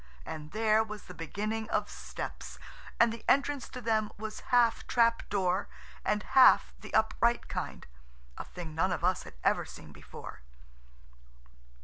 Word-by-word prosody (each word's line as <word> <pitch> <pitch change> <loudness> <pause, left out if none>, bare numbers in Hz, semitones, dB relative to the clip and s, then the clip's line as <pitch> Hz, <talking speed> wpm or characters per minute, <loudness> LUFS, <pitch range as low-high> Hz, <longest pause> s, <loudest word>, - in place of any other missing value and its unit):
And 155 -1 -7
there 220 0 +3
was 215 -1 -8
the 180 - -10
beginning 215 +7 -3
of - - 0
steps, - - -7 0.4
and 230 -1 +5
the 230 - -9
entrance 280 -1 +2
to 250 - -7
them 220 -2 +1
was 215 +1 -6
half 240 -2 +3
trap 230 -1 +2
door, 190 -1 +1 0.4
and 210 0 0
half 265 -1 +6
the - - -10
upright 230 +2 +2
kind–a - - -8
thing 170 -3 -8
none 180 +4 +1
of 175 - -2
us 185 +1 +1
had - - -12 0.3
seen - - -11
before. - - -11
215 Hz, 140 wpm, -31 LUFS, 175-230 Hz, 0.4 s, half